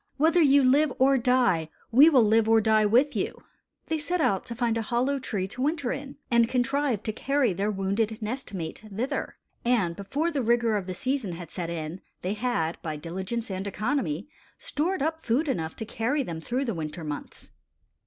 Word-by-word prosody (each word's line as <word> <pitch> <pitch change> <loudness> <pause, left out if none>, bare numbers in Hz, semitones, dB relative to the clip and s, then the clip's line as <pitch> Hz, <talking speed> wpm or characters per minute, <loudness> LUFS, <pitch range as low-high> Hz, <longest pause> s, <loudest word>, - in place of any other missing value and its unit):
Whether 325 +4 +4
you 280 -2 +5
live 280 +3 +4
or 270 +1 +4
die, 240 -10 +2 0.2
we 275 +7 +8
will 265 -7 +5
live 220 +1 +3
or 225 0 +6
die 215 -1 +3
with 255 +7 +3
you." - - -3 0.4
They 320 -1 -1
sought 350 +4 -2
out 195 - +1
a 235 -1 0
hollow 250 +5 0
tree 200 -7 -3
to 255 - -6
winter 290 -2 0
in, 275 0 -6
and 235 -1 +4
contrived 255 -2 0
to 215 - -2
carry 270 -2 +1
their 200 +4 -1
wounded 210 +3 -1
nest 245 +5 -4
mate 165 +2 -5
thither; 250 +8 -3 0.3
and 225 -9 +1
before 285 - -2
the 285 -4 -1
rigor 235 -1 +2
of 195 -3 -2
the 185 - -4
season 255 -4 -1
had 170 -1 -8
set 170 -2 -4
in, 165 +1 -5 0.2
they 185 +3 -1
had, 210 -8 -1
by 155 -2 -4
diligence 190 +8 -4
and 190 +1 -3
economy, 200 - -1 0.3
stored 320 +1 -1
up 320 +1 -1
food 260 +6 +1
enough 160 - -2
to 220 - -5
carry 245 +7 -1
them 165 -8 -6
through 255 +9 -2
the 230 - -1
winter 160 0 -5
months. 150 -2 -7
230 Hz, 190 wpm, -27 LUFS, 190-275 Hz, 0.4 s, we